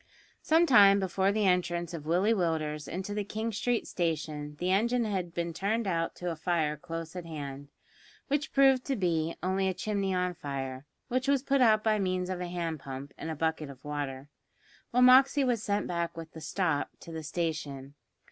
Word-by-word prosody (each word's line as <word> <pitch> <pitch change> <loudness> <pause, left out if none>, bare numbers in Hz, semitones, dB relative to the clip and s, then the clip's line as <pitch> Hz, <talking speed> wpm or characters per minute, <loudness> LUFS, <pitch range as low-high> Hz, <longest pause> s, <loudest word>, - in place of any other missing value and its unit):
Some 325 +2 +4
time 200 -8 +7
before 190 +1 +1
the 210 0 +1
entrance 175 -2 +1
of 155 -3 -6
Willie 185 +7 +3
Willders 155 -6 -1
into 190 +4 -4
the 210 0 -1
King 220 +3 -3
Street 235 +2 0
station 150 -3 -3
the 180 +1 0
engine 235 +5 +2
had 190 -5 -2
been 170 0 -3
turned 210 +6 -1
out 165 -3 -1
to 175 -1 -3
a - - -4
fire 160 -2 0
close 165 +3 -7
at 175 -2 -6
hand, 145 -3 -6 0.6
which 290 +1 -1
proved 270 -2 +5
to 275 - 0
be 170 -5 0
only 190 +1 +1
a 190 - -1
chimney 200 -2 -1
on 180 -1 0
fire, 135 -4 -4
and 130 +1 -10 0.3
which 255 +1 +1
was 275 -2 +2
put 275 -1 +2
out 215 -3 +5
by 215 -1 +2
means 185 -1 -1
of 180 -1 -3
a 180 - -3
hand 170 -3 -3
pump 135 +1 -8
and 160 - -6
a 160 - -3
bucket 160 -1 -1
of 130 -1 -13
water, 145 -2 -4 0.6
while 250 +1 +3
Moxey 265 +3 +7
was 245 -4 +1
sent 205 -1 0
back 170 -1 -3
with 165 -1 -7
the 160 - -10
"stop" 155 -2 0
to 170 - -10
the 160 -1 -5
station. 145 -4 -4
175 Hz, 200 wpm, -30 LUFS, 160-210 Hz, 0.6 s, time